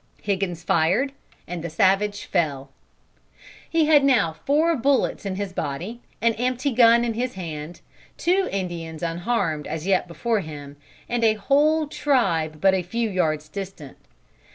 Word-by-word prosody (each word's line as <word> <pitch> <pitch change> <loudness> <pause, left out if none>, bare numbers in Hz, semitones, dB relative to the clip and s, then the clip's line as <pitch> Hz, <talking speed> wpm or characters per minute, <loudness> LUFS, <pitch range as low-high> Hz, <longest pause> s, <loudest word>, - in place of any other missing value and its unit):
Higgins 190 -4 -2
fired 185 - +2 0.4
and 175 -2 -5
the 170 - -3
savage 195 +5 +1
fell. 145 -7 -1 1.0
"He 325 -1 +3
had 300 -2 +5
now 235 -12 +3
four 300 - +1
bullets 270 -5 +1
in 190 - -3
his 195 -1 -4
body, 180 +12 -4 0.2
an 230 0 +4
empty 255 +3 0
gun 235 0 +5
in 230 - -1
his 245 +1 -3
hand, 165 -2 -7 0.4
two 375 +2 +1
Indians 170 -4 -4
unharmed 170 -2 -1
as 160 +1 -4
yet 190 -2 +2
before 215 +7 -1
him, 145 -5 -8 0.3
and 240 -1 -1
a 220 -1 +4
whole 295 +8 +2
tribe 190 - 0
but 190 +2 +4
a 190 - +1
few 225 +5 -2
yards 155 -5 0
distant. 180 -5 -8
195 Hz, 150 wpm, -23 LUFS, 165-240 Hz, 1.0 s, had